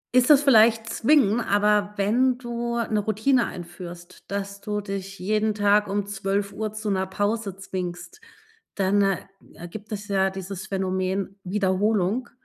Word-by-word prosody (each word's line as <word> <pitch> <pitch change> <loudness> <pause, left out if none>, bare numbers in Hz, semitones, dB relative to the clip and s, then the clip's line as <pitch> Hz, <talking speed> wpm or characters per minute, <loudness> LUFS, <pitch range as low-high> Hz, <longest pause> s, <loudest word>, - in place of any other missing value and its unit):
ist 255 +1 +5
es 290 -1 +7
vielleicht 225 -3 +5
zwingen, 240 -4 +3
aber 210 -1 +2
wenn 245 +6 +2
du 235 -1 -3
'ne 220 -2 0
Routine 220 +5 +1
einführst, 175 0 -10
dass 200 0 -4
du 210 0 -2
dich 195 -1 -6
jeden 215 +2 0
Tag 205 0 +3
um 200 0 -1
12:00 200 +1 -2
zu 215 -1 -3
'ner 190 -1 0
Pause 205 0 -2
zwingst, 185 - -6 0.5
dann, 200 +1 +2
äh, 195 -1 0 0.4
gibt 215 +3 -10
es 205 0 -5
ja 195 -1 +2
dieses 190 0 -7
Phänomen 190 0 -2
Wiederholung 200 +4 0
205 Hz, 140 wpm, -24 LUFS, 195-220 Hz, 0.5 s, es